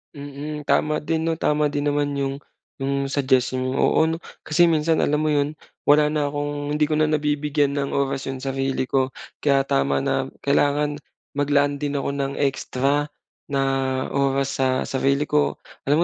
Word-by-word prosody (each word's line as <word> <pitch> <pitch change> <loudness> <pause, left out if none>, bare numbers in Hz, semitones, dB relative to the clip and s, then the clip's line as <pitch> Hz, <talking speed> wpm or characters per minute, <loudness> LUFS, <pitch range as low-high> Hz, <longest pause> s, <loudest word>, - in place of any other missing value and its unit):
Mm, 145 +1 -7
tama 150 +2 +2
din 160 +1 -1
'no, 165 0 -1
tama 150 -1 +1
din 145 0 -1
naman 145 0 +1
'yong 135 0 -1 0.5
'yong 140 0 0
suggestion 130 -2 +1
mo. 130 +1 -1
Oo - - +4
'no, 165 - -3 0.2
kasi 170 +3 +4
minsan 160 0 +2
alam 150 +1 +1
mo 155 - +1
'yon 145 +1 +1 0.3
wala 150 +1 +5
na 150 -1 0
kong 145 0 -3
hindi 150 - +2
ko 155 0 +1
na 155 - +3
nabibigyan 150 -1 +1
ng 140 0 -2
oras 135 -1 -1
'yong 135 0 -5
sarili 135 -1 -1
ko, 130 0 +1 0.3
kaya 140 -2 +3
tama 70 - +1
na - - 0 0.2
kailangan 145 +1 +1 0.3
maglaan 145 0 +1
din 145 0 -2
ako 140 0 -1
ng 140 -1 -2
extra 140 +1 0 0.4
na 140 -1 0 0.5
oras 140 0 0
sa 130 -1 +2
sarili 135 +2 +1
ko. 150 0 +1 0.3
Alam 150 +4 +4
145 Hz, 170 wpm, -23 LUFS, 135-150 Hz, 0.5 s, wala